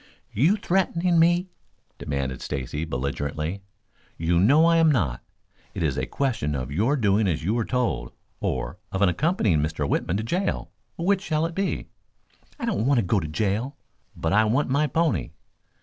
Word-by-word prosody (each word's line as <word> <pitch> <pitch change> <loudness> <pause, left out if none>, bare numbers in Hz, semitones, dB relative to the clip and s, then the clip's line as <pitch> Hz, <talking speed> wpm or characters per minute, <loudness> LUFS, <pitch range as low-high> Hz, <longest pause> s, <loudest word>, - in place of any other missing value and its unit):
"You 155 - +4
threatening 180 -3 +1
me?" 175 +2 +3 0.5
demanded 70 -2 -3
Stacy 70 +3 -3
belligerently. 70 +6 -3 0.6
"You 85 +1 +1
know 140 - +5
I 170 0 +4
am 165 -1 +5
not. 80 - 0 0.5
It - - -2
is - - +1
a - - -2
question 115 - -1
of 65 0 -4
your 115 - +1
doing 105 -3 +2
as 80 -3 -1
you 100 +7 0
are 115 - 0
told, 85 - -1 0.3
or - - -3
of 95 +1 0
accompanying 105 - +2
Mr. 75 -1 -1
Whitman 90 +6 0
to 110 - -2
jail. 180 - -2 0.3
Which 190 +3 +1
shall 160 -4 0
it 165 - -4
be?" 195 +2 -2 0.7
"I - - -3
don't 190 - 0
want 140 -1 +4
to 110 - 0
go 100 +3 +2
to 80 - -4
jail, 105 - -1 0.4
but 80 - -1
I 110 +2 +5
want 125 +7 +1
my 145 +3 +2
pony." 160 - 0
110 Hz, 170 wpm, -25 LUFS, -, 0.7 s, know